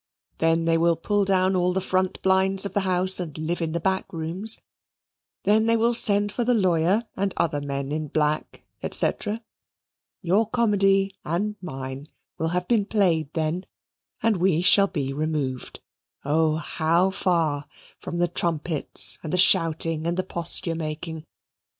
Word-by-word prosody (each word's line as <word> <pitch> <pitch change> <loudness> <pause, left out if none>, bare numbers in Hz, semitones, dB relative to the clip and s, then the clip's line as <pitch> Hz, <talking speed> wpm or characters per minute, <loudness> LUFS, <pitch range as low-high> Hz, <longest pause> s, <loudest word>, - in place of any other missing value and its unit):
Then 165 0 +2
they 165 0 +2
will 170 0 +3
pull 205 +4 0
down 190 0 +2
all 180 0 +1
the 190 - 0
front 185 0 -1
blinds 190 +1 +2
of 200 - -5
the - - +1
house 185 -1 +1
and 165 -5 -6
live 165 +3 -3
in 165 -1 -2
the 170 - -1
back 190 +2 -2
rooms 170 +7 +1 0.8
then 215 +3 +3
they 230 0 +3
will 230 +2 +2
send 205 -2 +4
for 240 - -2
the 245 +1 +2
lawyer 185 +2 +1
and 195 0 -2
other 150 -3 0
men 140 -1 -4
in 155 0 -3
black, 150 +1 -2 0.2
&c. - - +3 1.1
Your 200 +5 +1
comedy 195 -4 +2
and 200 +7 -2
mine 135 -4 -7 0.3
will 160 - 0
have 180 +2 -2
been 225 -4 +2
played 170 -9 +1
then, 160 +3 -2 0.6
and 225 -3 +2
we 175 -2 +1
shall 200 +2 +6
be 140 -7 -3
removed, 145 -4 -4 0.4
oh, 155 +2 +2
how 170 +3 0
far, 165 -7 -1 0.3
from 170 - -6
the 175 0 +2
trumpets, 165 -3 +1
and 155 - -6
the 180 - 0
shouting, 165 -3 +3
and 170 +1 -1
the 185 - 0
posture 170 -1 +1
making. 160 0 -6
175 Hz, 160 wpm, -24 LUFS, 160-195 Hz, 1.1 s, shall